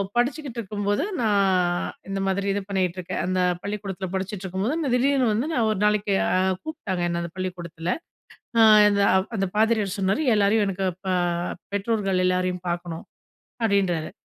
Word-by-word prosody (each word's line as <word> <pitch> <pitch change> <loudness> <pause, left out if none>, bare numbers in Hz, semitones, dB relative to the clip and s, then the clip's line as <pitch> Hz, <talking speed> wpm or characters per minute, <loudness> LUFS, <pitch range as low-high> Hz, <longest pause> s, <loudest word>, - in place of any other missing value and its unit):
படிச்சுகிட்டு 255 0 -1
இருக்கும்போது, 205 +3 -1 0.2
நான் 190 -5 +2 0.2
இந்த 195 0 -2
மாதிரி 195 +1 0
இது 200 +1 -1
பண்ணிகிட்டுருக்கேன். 185 -2 -2
அந்த 185 +1 0 0.2
பள்ளிக்கூடத்துல 200 -2 -4
படிச்சிட்டுருக்கும்போது, 190 - -2 0.2
திடீர்னு 265 0 +3
வந்து 225 +6 0
நான் 235 -5 +2
ஒரு 210 - -2
நாளைக்கு 210 -1 +2 0.5
கூப்ட்டாங்க 305 - -4
என்ன 170 0 -1
அந்த 170 -1 -5
பள்ளிக்கூடத்துல. 175 -2 -4 0.7
ஆ. - - +6 0.3
அந்த, 200 0 +2 0.3
அந்த 195 -1 0
பாதிரியார் 220 -3 +2
சொன்னாரு, 195 +8 +1
எல்லாரையும் 210 +1 +3
எனக்கு 190 0 -2
இப்ப 190 +2 -9 0.7
பெற்றோர்கள் 200 -3 0
எல்லாரையும் 185 -1 0
பார்க்கணும். 170 -1 -4 0.6
அப்டின்றாரு. 190 -7 +1
195 Hz, 130 wpm, -24 LUFS, 185-210 Hz, 0.7 s, ஆ